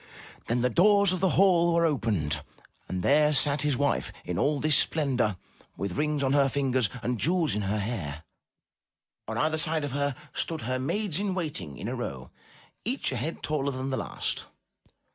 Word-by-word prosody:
Then 120 +1 0
the 125 - +2
doors 200 - +5
of 185 - -2
the 190 +1 +2
hall 170 -3 +4
were 170 0 +3
opened, 100 - 0 0.5
and 90 -1 -3
there 150 +1 +4
sat 145 0 +5
his 145 -3 +1
wife 145 0 0
in 90 -1 -3
all 145 0 +1
this 155 0 +4
splendor, 130 - +1 0.4
with 95 -3 -3
rings 150 -1 0
on 135 0 +1
her 140 -1 +4
fingers 130 -5 +1
and 120 -1 -1
jewels 170 - +2
in 105 - -1
her 100 +2 -1
hair. 90 -8 -4 1.0
On 110 +1 -4
either 155 +4 +1
side 155 -1 +1
of 145 - -3
her 140 0 -1 0.2
stood 160 -2 -2
her 130 +2 -2
maids 185 +5 -1
in 200 -2 -1
waiting 145 - -4
in - - -6
a - - -3
row, 65 -2 -6 0.5
each 255 +5 -2
a - - -3
head 160 - -4
taller 140 -2 -1
than 130 +1 -4
the 130 - -1
last. - - -3
140 Hz, 185 wpm, -27 LUFS, 115-160 Hz, 1.0 s, doors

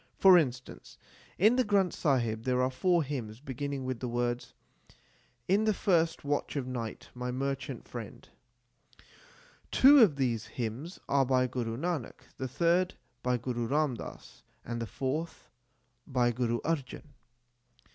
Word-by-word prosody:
For 190 -1 +8
instance, 130 -7 -1 0.4
in 215 +7 +5
the 255 - +4
Granth 200 -5 +2
Sahib 120 -7 0
there 125 +1 0
are 130 +1 +2
four 175 +5 +2
hymns 120 -6 -5
beginning 140 0 -4
with 130 -2 -3
the 125 - -3
words, 120 0 -2 0.9
In 200 +4 +3
the 215 -2 +2
first 165 -6 +1
watch 145 +1 -1
of 140 -3 -1
night, 120 -3 -5
my 125 0 -4
merchant 135 0 -4
friend/ 115 -4 -8 1.4
Two 280 +2 +7
of 205 - +6
these 120 -5 -1
hymns 125 - -5
are 140 -1 +3
by 130 -1 +3
Guru 120 -2 -3
Nanak, 165 -4 -3 0.2
the 130 - -3
third 170 +7 +1 0.3
by 125 0 +1
Guru 120 -1 -3
Ram 150 +1 +1
Das, 115 - -10 0.2
and 115 0 -4
the 115 - -3
fourth 140 - -4 0.6
by 125 -3 +2
Guru 120 -1 -1
Arjan. 145 -6 -3
130 Hz, 145 wpm, -30 LUFS, 120-165 Hz, 1.4 s, For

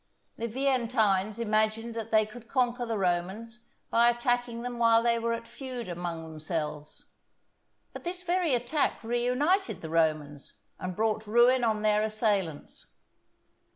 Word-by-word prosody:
The 230 - -3
Veientines 230 -5 +1
imagined 220 +1 0
that 225 -1 -5
they 220 -1 +4
could 225 +2 -12
conquer 245 -1 0
the 225 -1 -1
Romans 195 +6 -2 0.2
by 235 +1 +5
attacking 240 0 0
them 245 -1 -5
while 230 -1 +5
they 235 0 +2
were 230 0 -1
at 230 0 -5
feud 255 -4 -7
among 175 -2 -4
themselves; 155 -1 -5 0.8
but - - -8
this 360 +1 -4
very 350 -5 +1
attack 245 +4 -1
reunited 250 - +1
the 160 - -6
Romans 155 -5 0 0.2
and 185 -1 -4
brought 215 0 0
ruin 240 +3 +5
on 215 -2 +1
their 210 0 +3
assailants. 210 -7 -1
230 Hz, 140 wpm, -29 LUFS, 195-245 Hz, 0.8 s, by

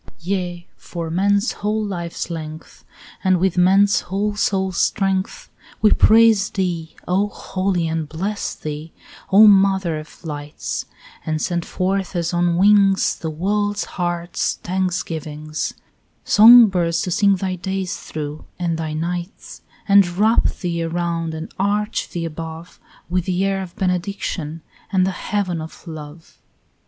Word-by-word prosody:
11 - - -39
Yea, 180 -2 -3
for 165 -2 -6
man's 200 +5 +2
whole 215 +1 -2
life's 175 -3 -4
length, 155 -1 -8 0.4
And 185 -1 +3
with 190 0 +1
man's 195 +3 +4
whole 205 +3 -2
soul's 190 -3 0
strength, 195 - -1 0.3
We 215 - +6
praise 220 -3 +5
thee, 175 -4 -3
O 190 +3 +2
holy, 185 -3 -2
and 160 -2 -3
bless 195 +6 -3
thee, 155 +1 -7 0.4
O 205 +3 +8
mother 190 -5 +4
of 155 +3 -13
lights; 145 -1 -5 0.4
And 155 0 -2
send 170 +1 -2
forth 190 0 -2
as 170 0 -1
on 175 0 +1
wings 195 0 +4
The 160 - -5
world's 205 +5 -1
heart's 175 -1 -2
thanksgivings, 160 -5 -3 0.5
Song 235 +3 +9
birds 170 -4 0
to 180 - -3
sing 200 +1 +4
thy 190 0 -2
days 190 0 -3
through 150 -1 -6
and 170 -2 -2
thy 155 -1 -3
nights; 175 +4 -5 0.3
And 200 -2 +6
wrap 220 +3 +3
thee 170 -2 -3
around 165 -1 -2
and 160 +1 -7
arch 205 +2 0
thee 170 -1 -4
above 165 +1 -8 0.3
With 180 0 -1
the 185 +1 0
air 195 0 0
of 185 -2 -8
benediction 180 -5 -3 0.3
and 185 -2 +3
the 190 - 0
heaven 185 -3 -2
of 160 +3 -10
love. 155 0 -10
180 Hz, 140 wpm, -20 LUFS, 165-195 Hz, 0.5 s, Song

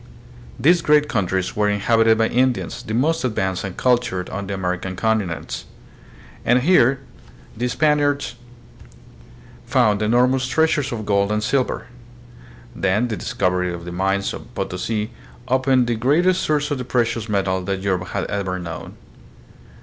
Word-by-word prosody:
These 170 +7 +4
great 150 -2 +4
countries 95 -4 -1
were 105 0 +2
in 105 0 0
habited 115 +1 +3
by 110 0 +3
Indians, 125 +1 0
the 110 - -4
most 155 +6 +1
advanced 95 -6 -1
and 95 -2 -6
cultured 120 -8 0
on 100 +1 -4
the 100 - -3
American 95 0 -3
continents. 105 -5 -2 0.8
And 125 +1 +3
here 135 -5 +4 0.5
the 125 +3 -1
Spaniards 145 -1 +1 1.3
found 105 -1 +2
enormous 125 +4 +2
treasures 150 +1 +1
of 110 -3 -4
gold 100 0 +1
and 105 0 0
silver. 130 +3 0 0.9
Then, 100 +6 +1
the 110 - -2
dis - - -6
covery 90 -1 +1
of 85 -1 -7
the 90 - -6
mines 95 +2 0
of - - -10
Potosi 105 +4 -3 0.4
opened 130 0 +3
the 120 - 0
greatest 155 +11 +2
source 150 -1 0
of 145 - -1
the - - -3
precious 115 -3 -1
metal 95 -2 0
that 95 +1 -3
Europe 95 -2 -1
had 100 - -3
ever 95 -2 -2
known. 85 -1 -7
110 Hz, 150 wpm, -21 LUFS, 95-130 Hz, 1.3 s, These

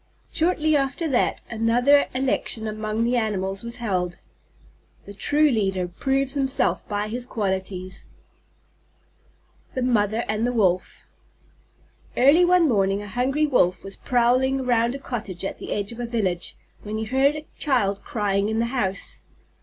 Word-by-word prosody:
Shortly 315 -2 +1
after 280 +4 0
that, 255 - +1
another 240 +5 +3
election 255 -3 -1
among 215 +1 -2
the 240 +2 +1
Animals 195 -4 -1
was 235 0 -6
held. 180 -7 -2 0.9
The 200 - -9
true 295 +9 +2
leader 195 -5 0
proves 270 +8 0
himself 270 -1 0
by 205 0 -2
his 240 +3 -5
qualities. 190 -4 -3 1.7
THE 255 - -1
MOTHER 225 -2 +1
AND 215 +2 0
THE 245 - -1
WOLF 185 -5 0 1.1
Early 285 +8 +6
one 355 -1 +4
morning 200 -4 +1
a - - -8
hungry 260 +8 0
Wolf 185 -11 +2
was 195 0 -6
prowling 255 +2 +2
around 240 -1 +1
a - - -3
cottage 215 -9 -5
at - - -5
the - - -7
edge 205 +1 -1
of 235 - -9
a 240 - -3
village, 190 -7 -2 0.2
when 215 +1 -5
he 220 - -2
heard 265 +5 +2
a 305 0 -7
child 205 -9 +1
crying 205 -4 0
in 220 - -1
the 230 - +1
house. 195 -6 -2
230 Hz, 150 wpm, -24 LUFS, 200-265 Hz, 1.7 s, Early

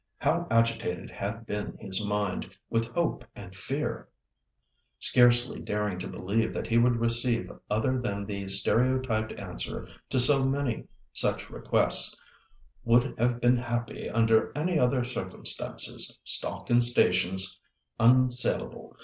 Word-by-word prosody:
How - - 0
agitated 115 -6 0
had 115 +3 -6
been 105 -1 -5
his 100 -1 0
mind 105 -2 -3 0.2
with 115 0 0
hope 165 -6 -1
and 95 -2 -11
fear! 90 - -4 0.9
Scarcely 120 0 +3
daring 105 -3 -3
to - - -5
believe 110 +4 -2
that - - -3
he 115 0 +2
would 120 0 +3
receive 115 +1 0 0.2
other 125 +5 0
than 100 -4 -4
the 100 -1 -6
stereotyped 110 +3 +3
answer 95 -3 -5 0.2
to - - -1
so 135 +2 +6
many 135 -2 -2 0.3
such - - -1
requests—"Would 120 - -1
have 120 +1 +1
been 120 +1 +3
happy 120 -1 -4
under 115 0 +2
any 165 +2 0
other 125 -1 +1
circumstances. 95 -7 -1
Stock - - +2
and 120 0 +5
stations 95 -5 +1 0.4
unsalable. 125 +1 +1
115 Hz, 125 wpm, -27 LUFS, 105-125 Hz, 0.9 s, so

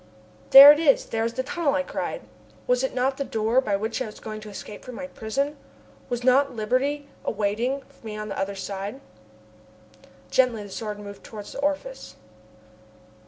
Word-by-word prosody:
"There 275 +2 +12
it 295 - +3
is, 295 -4 +3
there 225 0 -2
is 230 - -2
the 260 - -1
tunnel!" 290 +1 0
I 280 - +1
cried. - - -4 0.4
Was 250 +1 +1
it 265 - -2
not 265 +1 0
the 280 - -1
door 225 +1 +1
by 210 -6 0
which 220 +5 -3
I 255 - -2
was 210 - -11
going 215 -1 -7
to 215 - -9
escape 205 +1 -9
from 250 - -9
my 275 - -6
prison? 275 +4 -3 0.5
Was 245 0 -3
not 260 +1 +3
liberty 265 +6 -1 0.2
awaiting 225 +6 -1 0.2
me 215 -2 -7
on 215 0 -5
the - - -4
other 195 +1 -2
side? 195 +5 -5 1.3
Gently 245 -5 +2
the 205 - -10
Sword 210 +1 -5
moved 200 -1 -10
towards 210 -2 -9
the - - -8
orifice. 295 - -3
245 Hz, 180 wpm, -25 LUFS, 215-275 Hz, 1.3 s, There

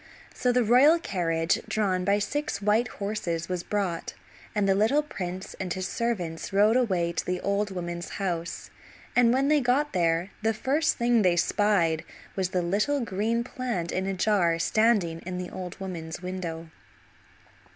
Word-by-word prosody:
So 250 - +1
the 245 0 +3
royal 260 +9 +6
carriage 170 - 0
drawn 190 -4 0
by 200 +2 +3
six 290 +9 -2
white 210 +4 +2
horses 200 -6 -3
was 180 -1 -2
brought, 195 -3 -2 0.4
and 205 -2 +2
the 195 - +4
little 225 +10 +3
prince 185 -9 -6
and 185 -2 -3
his 185 0 -2
servants 185 -9 -3
rode 205 +3 +4
away 185 -9 +1
to 170 - -2
the 180 0 -2
old 200 +1 0
woman's 175 -2 -5
house, 170 -4 -3 0.4
and 240 -1 +5
when 265 +2 +2
they 300 0 +4
got 270 +4 +1
there 170 0 +1
the 220 0 +1
first 285 +7 +1
thing 235 -1 +3
they 180 -3 +3
spied 175 -3 +2 0.3
was 190 -2 0
the 180 -1 0
little 210 +11 +1
green 225 +2 -1
plant 235 -9 -3
in 190 +1 -1
a 195 - -1
jar 180 -4 +2
standing 195 -3 +2
in 180 0 -5
the 180 -1 -5
old 180 -1 -7
woman's 170 -4 -6
window. 170 -3 -5
195 Hz, 165 wpm, -27 LUFS, 175-230 Hz, 0.4 s, royal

